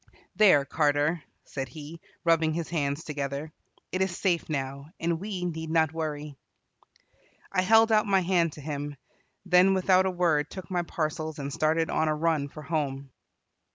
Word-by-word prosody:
"There, 185 -9 +6
Carter," 150 +2 +1 0.2
said 135 -1 -5
he, 155 +5 -10 0.2
rubbing 165 -2 +3
his 170 -1 -3
hands 145 -2 -1
together, 145 +1 -4 0.4
"it 185 - -1
is 190 -2 0
safe 175 -5 0
now, 140 -1 -3
and 165 0 0
we 190 -2 -4
need 160 -2 -4
not 160 -1 +2
worry." 150 -3 -4 1.1
I 185 - +2
held 225 +4 +5
out 215 0 +4
my 195 -1 +3
hand 170 -2 +2
to 150 - -10
him, 145 0 -4 0.5
then 185 +1 +5
without 185 0 +4
a - - +2
word 170 -5 +1
took 185 -1 -9
my 180 -1 +1
parcels 155 -2 -3
and 140 -1 -5
started 160 +2 +1
on 160 - +1
a 155 - +1
run 155 -2 0
for 150 - -10
home. 140 -3 -3
160 Hz, 165 wpm, -27 LUFS, 145-180 Hz, 1.1 s, There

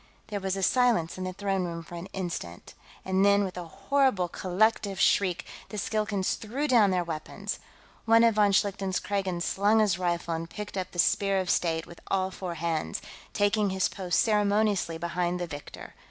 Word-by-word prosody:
There 205 -1 -2
was 190 0 -2
silence 235 -10 +2
in 185 - -3
the 185 - -4
throne 195 -1 -1
room 170 -1 -4
for 170 - -13
an 170 +2 -6
instant, 175 - -6 0.3
and 190 +1 +2
then, 200 0 +5
with 190 -2 -4
a 180 -1 -5
horrible 260 - +1
collective 195 +2 0
shriek, 185 -3 +2 0.2
the 210 - -6
Skilkans 210 -1 -1
threw 260 +8 -3
down 230 -7 +5
their 180 -1 +1
weapons. 160 -2 -5 0.5
One 230 0 +6
of 230 -1 +5
von 205 -1 +4
Schlichten's 195 -1 +1
Kragans 190 -4 -2
slung 205 +3 +2
his 205 -5 +3
rifle 170 -1 -1
and 165 +1 -4
picked 210 +2 -7
up 185 -1 -3
the - - -12
Spear 195 +2 +2
of 185 -1 0
State 165 -2 0
with 170 - -13
all 190 -1 0
four 180 -2 -5
hands, 165 -1 -2 0.3
taking 205 0 +2
his 190 0 +1
post 180 -4 -1
ceremoniously 210 -5 +2
behind 175 +1 -1
the 175 - -2
victor. 145 -3 -9
190 Hz, 185 wpm, -28 LUFS, 175-205 Hz, 0.5 s, One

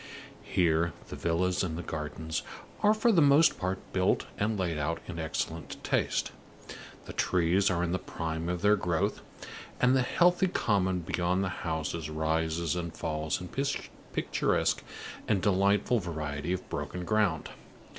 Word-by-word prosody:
Here 85 -1 +2 0.2
the - - -5
villas 90 +2 +1
and 85 -1 -3
gardens 80 +1 -3 0.4
are 210 +1 +5
for 225 +2 +3
the 175 -6 +5
most 145 +2 +5
part 95 +1 -1 0.2
built 95 0 +2
and 105 +1 +1
laid 85 -5 -1
out 80 +3 -1
in 85 -2 -6
excellent 80 -1 -3
taste, - - 0 0.7
the - - -8
trees 90 +2 +2
are 85 -2 +1
in 85 - -1
the 90 - 0
prime 80 0 -4
of 90 0 -2
their 105 +1 +6
growth, 85 -4 0 0.6
and 125 +1 +4
the 130 - +4
healthy 175 +8 +3
common 95 - +1
beyond 90 +2 0
the 100 - -1
houses 80 -2 -3
rises 80 +2 0
and 85 -2 -4
falls 80 -1 -2
in 90 - -7 0.6
picturesque - - +1 0.4
and 105 -3 +2
delightful 100 +4 +3
variety 80 -3 -3
of 90 0 -3
broken 90 0 -4
ground. 100 -7 +1
90 Hz, 145 wpm, -30 LUFS, 80-100 Hz, 0.7 s, their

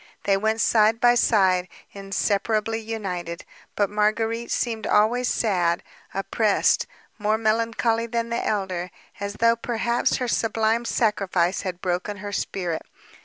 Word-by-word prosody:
They 195 - +3
went 220 +3 0
side 220 +1 +4
by 240 0 +5
side, 190 -6 +3 0.2
inseparably 210 +3 -1
united. 185 -7 -5 0.3
But 205 -1 +1
Marguérite 225 +2 0
seemed 225 -3 -1
always 235 +4 +3
sad, 180 -8 +1 0.3
oppressed, 205 +2 +1 0.3
more 215 +1 +1
melancholy 230 +1 +1
than 235 0 -2
the 235 - -1
elder, 185 -4 -2 0.3
as 200 0 -4
though 230 +1 +3
perhaps 235 0 0
her 250 - -2
sublime 225 0 +1
sacrifice 195 -6 +1
had 185 -2 -5
broken 185 +3 -2
her 205 +1 -6
spirit. 180 -4 -2
215 Hz, 125 wpm, -24 LUFS, 195-230 Hz, 0.3 s, by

